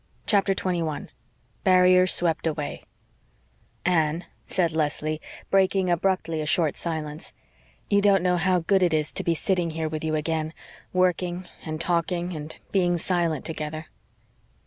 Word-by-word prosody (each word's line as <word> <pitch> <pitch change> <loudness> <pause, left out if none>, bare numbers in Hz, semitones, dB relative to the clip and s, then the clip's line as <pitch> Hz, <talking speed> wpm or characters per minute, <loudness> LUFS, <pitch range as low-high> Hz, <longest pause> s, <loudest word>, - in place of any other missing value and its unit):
CHAPTER 195 -2 +3
21 170 -5 -2 0.5
BARRIERS 185 0 +5
SWEPT 165 -1 +2
AWAY 150 -2 -3 1.0
"Anne," 165 -1 +1 0.2
said 170 -3 +1
Leslie, 155 0 -1 0.3
breaking 190 -1 +3
abruptly 170 -2 0
a 150 - -3
short 155 -2 +3
silence, 155 -1 -5 0.5
"you 200 -1 +3
don't 200 -3 +4
know 180 -1 +2
how 180 0 +2
GOOD 190 +3 +2
it 175 -3 +3
is 155 0 0
to - - -2
be 170 - +1
sitting 180 0 0
here 160 0 -3
with 155 0 -4
you 155 -1 0
again 155 0 -2 0.4
working 180 0 0 0.2
and 155 -1 -4
talking 175 +1 0
and 150 0 -7
being 175 -3 +2
silent 170 -4 -1
together." 155 0 -5
170 Hz, 140 wpm, -25 LUFS, 155-185 Hz, 1.0 s, BARRIERS